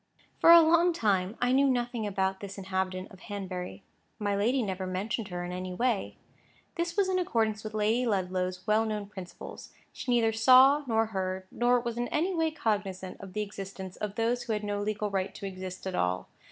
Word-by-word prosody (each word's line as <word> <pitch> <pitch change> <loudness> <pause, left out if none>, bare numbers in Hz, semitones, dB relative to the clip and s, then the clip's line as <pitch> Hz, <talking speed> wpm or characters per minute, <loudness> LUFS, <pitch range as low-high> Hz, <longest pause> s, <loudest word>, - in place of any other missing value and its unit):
For - - +5
a 340 0 +11
long 335 +2 +4
time, 200 - 0
I 245 0 +2
knew 275 +1 +4
nothing 240 -3 -1
about 190 -1 -1
this 200 0 -8
new - - -6
inhabitant 185 0 -3
of 190 - -14
Hanbury. 190 -2 -6 0.3
My 205 -1 -1
lady 240 +6 +2
never 190 -2 -3
mentioned 200 +4 -2
her 175 -2 -4
in 175 - -5
any 180 0 -5
way. 235 -1 0 0.6
This 340 +2 -3
was 400 -2 +3
in 370 -1 +1
accordance 220 -9 0
with 215 0 -6
Lady 220 +4 +2
Ludlow's 185 -2 -1
well 215 +1 +3
known 215 -2 -3
principles. 190 -3 -10 0.2
She - - -7
neither 230 -2 +3
saw 260 +6 +6
nor 225 -1 +2
heard, 185 0 -2
nor 245 +1 +3
was 235 -1 -4
in 240 - 0
any 350 +5 0
way 325 -2 +1
cognisant 205 -10 -3
of 195 -2 -10
the 210 - -1
existence 195 -2 -7
of 210 -1 -5
those 235 +2 0
who 240 -2 -2
had 210 0 -2
no 205 0 -2
legal 210 0 -2
right 195 0 -2
to - - -7
exist 185 -1 -7
at 190 - -3
all. 90 - 0
210 Hz, 205 wpm, -29 LUFS, 190-240 Hz, 0.6 s, a